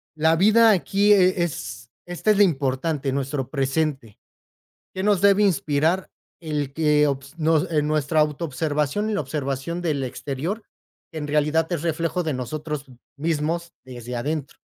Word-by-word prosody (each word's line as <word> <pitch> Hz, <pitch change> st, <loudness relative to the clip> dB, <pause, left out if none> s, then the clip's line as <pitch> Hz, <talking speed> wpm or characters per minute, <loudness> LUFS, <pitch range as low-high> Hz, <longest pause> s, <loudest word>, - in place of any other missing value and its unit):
la 160 Hz, +1 st, +3 dB
vida 220 Hz, +5 st, +5 dB
aquí 200 Hz, +2 st, +3 dB
e 185 Hz, -2 st, +4 dB
es 115 Hz, -, -5 dB, 0.2 s
Esto 175 Hz, +5 st, 0 dB
es 205 Hz, -, +2 dB
lo 205 Hz, -, +7 dB
importante, 140 Hz, -2 st, 0 dB
nuestro 135 Hz, -1 st, -2 dB
presente, 135 Hz, -4 st, -1 dB, 0.8 s
¿qué 190 Hz, -, -3 dB
nos 205 Hz, -2 st, +2 dB
debe 200 Hz, +1 st, +5 dB
inspirar? 165 Hz, -1 st, +1 dB, 0.3 s
El 150 Hz, -4 st, -3 dB
que 150 Hz, -1 st, +3 dB
ops 140 Hz, +3 st, -4 dB
nos 160 Hz, +2 st, +2 dB
En 150 Hz, -2 st, +1 dB
nuestra 155 Hz, +1 st, +1 dB
autoobservación 150 Hz, +5 st, -1 dB
y -, -, -1 dB
la -, -, 0 dB
observación 140 Hz, +3 st, -3 dB
del 150 Hz, -5 st, -1 dB
exterior, 150 Hz, -, -4 dB, 0.5 s
en 155 Hz, -2 st, -4 dB
realidad 150 Hz, +2 st, +2 dB
es 160 Hz, -, -2 dB
reflejo 165 Hz, +2 st, -1 dB
de 155 Hz, -, -1 dB
nosotros 150 Hz, +3 st, -5 dB, 0.3 s
mismos 165 Hz, +2 st, -2 dB
desde 125 Hz, -1 st, -7 dB
adentro. 145 Hz, +3 st, -4 dB
155 Hz, 145 wpm, -23 LUFS, 140-170 Hz, 0.8 s, lo